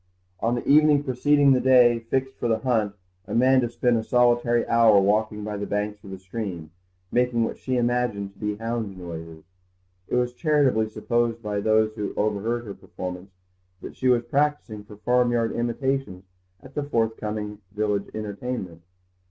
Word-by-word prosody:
On 115 +2 0
the 120 - -5
evening 150 0 +5
preceding 145 +1 +3
the 130 - +2
day 125 -2 +5
fixed 130 +3 -2
for - - -2
the 115 -1 +2
hunt 110 -6 0 0.3
Amanda 125 +2 +3
spent 120 0 +1
a 110 - -2
solitary 120 0 +2
hour 115 -3 +5
walking 105 +2 +1
by 105 0 -4
the 100 - -4
banks 105 0 -3
of 100 - -11
the 95 - -7
stream, 95 -4 -6 0.4
making 125 -1 +2
what - - -4
she 130 -1 -2
imagined 120 -5 -1
to - - -25
be 105 -1 -2
hound 115 -3 -4
noises. 80 -2 -8 0.6
It - - -2
was 125 0 0
charitably 135 -7 +2
supposed 115 +1 -1
by 105 -1 -2
those 110 +1 +2
who 105 -2 -5
overheard 110 +3 -1
her 100 - -6
performance, 90 0 -8 0.5
that - - -8
she 130 - -1
was 120 -2 +3
practising 135 -4 -1
for 105 - -12
farmyard 120 0 +1
imitations 120 -4 -2 0.4
at 130 - -14
the 145 - -2
forth 115 -6 0
coming 105 -1 -5
village 105 -1 -1
entertainment. 105 -4 -5
115 Hz, 165 wpm, -24 LUFS, 105-125 Hz, 0.6 s, evening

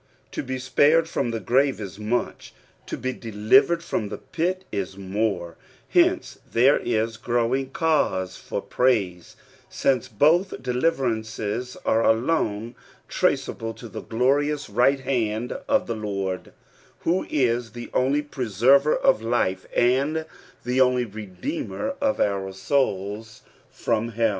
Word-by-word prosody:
To - - -3
be 130 -1 -4
spared 150 +5 +3
from 135 -6 -1
the 115 -1 -2
grave 130 +6 +2
is 100 -1 -7
much; 110 +3 -3 0.3
to - - -4
he 130 0 -3
de 115 -3 -8
livered 165 - +4
from 105 -9 -2
the - - -5
pit 185 +3 -2
is 95 -1 -4
more; 95 -3 -2 0.3
hence - - +2
there 130 +5 +4
is 115 -1 -1
growing 120 +3 0
cause 135 - 0
for' - - -5
praise, 100 -9 0 0.3
since 130 -4 +1
both 155 - +2
deliverances 125 -4 -1
are 115 +1 +3
alone 115 -2 +1 0.3
traceable 115 0 -1
to 120 - -10
the 105 - -7
glorious 140 +4 0
right 130 +5 +3
hand 120 -3 -1 0.2
of 275 -1 +3
the 115 - -3
Lord, 100 -3 -4 0.5
who 175 +3 0
is 120 -5 0
the 120 0 -8
only 140 +3 +2
preserver 135 +2 +3
of - - +3
life, 110 -5 0
and 140 +6 +2 0.4
the 125 +1 +2
only 125 -1 +3
Redeemer 195 - -5
of 275 -1 +1
our 100 -1 0
souls 105 -1 -2 0.3
from 115 0 -1
hell. 115 +1 +2
120 Hz, 135 wpm, -24 LUFS, 110-140 Hz, 0.5 s, livered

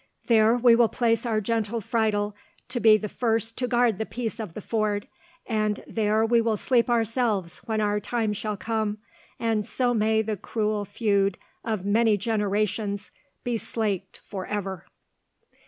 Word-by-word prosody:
There 225 0 +4
will 240 -1 +6
we 235 - +6
place 230 0 +1
our 220 -2 +1
gentle 225 +1 -1
Friedel 210 -2 0 0.3
to 245 -1 -2
be 220 -2 +7
the 210 - -4
first 225 0 -1
to 250 - 0
guard 240 -4 +2
the 220 - -1
peace 230 -2 -4
of 210 -7 -6
the - - -4
ford, 210 -1 -1 0.4
and 215 -2 -1
there 220 0 +1
will 235 0 +4
we 225 -2 +1
sleep 245 +2 +2
ourselves 225 -6 0
when 220 -1 -1
our 210 0 +1
time 220 0 -1
shall 210 0 -3
come, 220 -1 -1 0.4
and 225 -2 +1
so 245 -2 +1
may 220 0 +2
the 215 -1 -2
cruel 210 +1 -1
feud 200 -2 +1 0.3
of 215 -4 -2
many 215 +1 +3
generations 205 -1 -1 0.3
be 240 -2 -1
slaked 200 -5 -3
for 190 -2 -6
ever." 195 -3 -4
220 Hz, 160 wpm, -26 LUFS, 205-230 Hz, 0.4 s, be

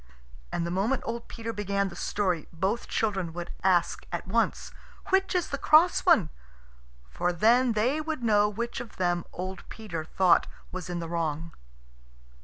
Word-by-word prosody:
And 170 - -1
the 170 - -3
moment 210 +9 0
old 235 0 -4
Peter 230 -1 -5
began 200 -1 -1
the 175 - -11
story 180 -4 -1
both 190 +8 -1
children 190 -7 -1
would 175 0 -6
ask 180 -2 +2
at 175 +1 -4
once, 230 +4 0 0.4
"Which 385 0 +2
is 355 - +1
the 280 - -3
cross 330 +6 +5
one?" 240 - +5 0.8
for 175 - 0
then 235 +7 +4
they 250 +8 +1
would 310 -4 -4
know 210 -2 +4
which 235 +3 -4
of 240 -2 -9
them 175 -2 0
old 185 +1 -6
Peter 185 -8 -5
thought 180 +2 +3 0.2
was 185 0 -6
in 175 - -2
the 170 -1 -4
wrong. 165 -1 -2
200 Hz, 165 wpm, -28 LUFS, 175-235 Hz, 0.8 s, cross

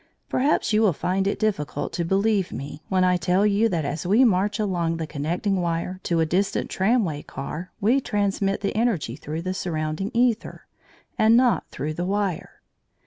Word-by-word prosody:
Perhaps 265 -3 +1
you 215 - +4
will 210 -5 +4
find 190 +5 -1
it 200 - 0
difficult 150 -9 -2
to 175 - -1
believe 195 +2 +1
me 145 +2 -7
when 185 -1 +2
I 180 0 +3
tell 180 +3 +2
you 210 +2 +3
that 165 -6 -1
as 145 +2 -3
we 210 +8 +4
march 205 -1 +2
along 175 -6 -1
the 165 - -3
connecting 170 +6 -1
wire 170 +2 -2
to 170 -1 +1
a 160 - +3
distant 190 +5 -1
tramway 190 -7 +1
car 155 +6 -7
we 240 +7 +3
transmit 200 -3 0
the 200 - -2
energy 215 - 0
through 155 +4 -5
the 185 +1 -2
surrounding 160 +1 -3
æther, 235 -1 0 0.6
and 220 +2 +6
not 245 -1 +2
through 150 +4 -4
the 175 +3 -3
wire. 195 -3 -2
185 Hz, 180 wpm, -24 LUFS, 165-210 Hz, 0.6 s, and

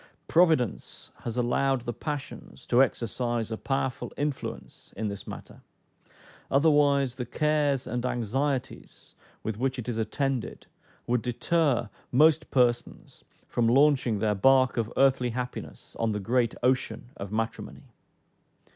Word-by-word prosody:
Providence 160 - +1
has 120 0 -5
allowed 130 +2 +1
the 120 0 -4
passions 145 +2 -7
to 125 +1 +4
exercise 120 -2 -1
a - - -1
powerful 135 -1 -2
influence 145 -2 -5
in 110 -1 -2
this 100 -1 -8
matter, - - -9 0.9
otherwise 140 -3 +3
the 125 - -3
cares 150 -1 +1
and 120 +1 -3
anxieties 130 +3 -3 0.3
with 110 -1 -4
which 130 +1 0
it 125 - -6
is 115 -2 -2
attended 130 +3 -2 0.4
would 120 0 +1
deter 130 +1 +1 0.2
most 155 +4 +4
persons 120 -2 0 0.2
from 120 -1 +1
launching 130 -3 +4
their 105 +1 +1
bark 130 +5 +4
of 115 -1 -1
earthly 135 -2 +3
happiness 125 +1 -6
on 115 -1 +1
the 105 - -2
great 115 +3 +1
ocean 125 -1 0
of 100 0 -7
matrimony. 115 +1 -4
125 Hz, 130 wpm, -27 LUFS, 115-140 Hz, 0.9 s, to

